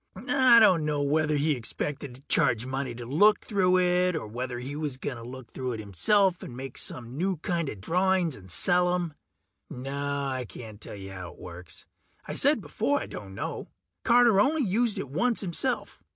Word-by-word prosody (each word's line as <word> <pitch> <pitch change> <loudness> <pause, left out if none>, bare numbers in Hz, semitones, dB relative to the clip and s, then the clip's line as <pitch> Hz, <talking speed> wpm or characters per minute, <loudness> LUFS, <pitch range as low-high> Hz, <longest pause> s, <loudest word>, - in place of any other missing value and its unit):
I 255 +2 +5
dunno 155 -8 +3
whether 150 +1 +1
he 150 +2 +1
expected 135 +2 -3
to 130 - -13
charge 115 -4 +2
money 130 -1 -3
to 120 0 -7
look 205 - +4
through 185 -3 +2
it, 180 0 +2
or 160 - -3
whether 125 +3 -4
he 130 +4 -6
was 150 -4 -3
gonna 120 -3 -5
look 125 0 -10
through 130 -1 -3
it 110 - -5
himself 175 - +2
and 120 - -8
make 135 -1 -6
some 120 0 -3
new 190 0 0
kinda 170 -4 -2
drawings 175 - +1
and 95 -2 -14
sell 180 - +3
'em. 175 -3 -3 0.6
No, 140 +2 -3
I 130 -2 -2
can't 110 -1 -11
tell - - -8
you 95 -1 -9
how 90 -2 -8
it - - -21
works 90 -1 -9 0.4
I - - -4
said - - +3
before - - 0
I - - -5
don't 95 -2 -9
know. - - -5 0.4
Carter 235 -4 +5
only 295 +5 +2
used 220 +1 +1
it 190 - -4
once 230 - 0
himself. 205 +7 -2
145 Hz, 185 wpm, -27 LUFS, 125-185 Hz, 0.6 s, I